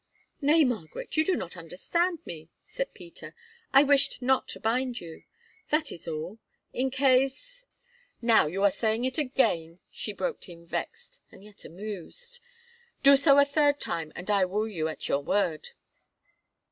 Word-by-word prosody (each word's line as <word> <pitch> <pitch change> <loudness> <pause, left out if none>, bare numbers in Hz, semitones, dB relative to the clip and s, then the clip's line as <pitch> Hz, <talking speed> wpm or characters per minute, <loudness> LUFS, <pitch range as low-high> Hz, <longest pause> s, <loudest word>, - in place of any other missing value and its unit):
"Nay, 305 +3 +5
Margaret, 225 - -3
you 315 - +4
do 370 +3 +1
not 170 - -5
understand 325 - -2
me," 160 -1 -9 0.2
said - - -5
Peter. 340 - -11 0.4
"I 275 +1 +7
wished 285 -1 +3
not 260 +1 +1
to - - -6
bind 245 +2 -1
you, 165 -2 -11 0.4
that 305 0 +1
is 170 - -8
all, 165 +7 -5 0.3
in 260 +2 0
case——" 270 - +1 0.5
"Now 230 -8 +4
you 190 +6 -2
are 200 - +5
saying 220 +4 0
it 260 +3 -1
again," 220 - 0
she - - -5
broke - - -4
in 170 -1 -13
vexed, 480 - -6
and - - -16
yet 210 -1 -12
amused. 215 - -7 0.6
"Do 280 0 +9
so 280 0 +5
a 285 - +7
third 290 0 +2
time, 160 -2 -4
and 185 +4 -4
I 200 -2 +4
will 205 +4 0
take 215 - -9
you 160 -1 0
at 155 - -5
your 140 - +1
word." 170 -1 -1
245 Hz, 165 wpm, -28 LUFS, 180-290 Hz, 0.6 s, Do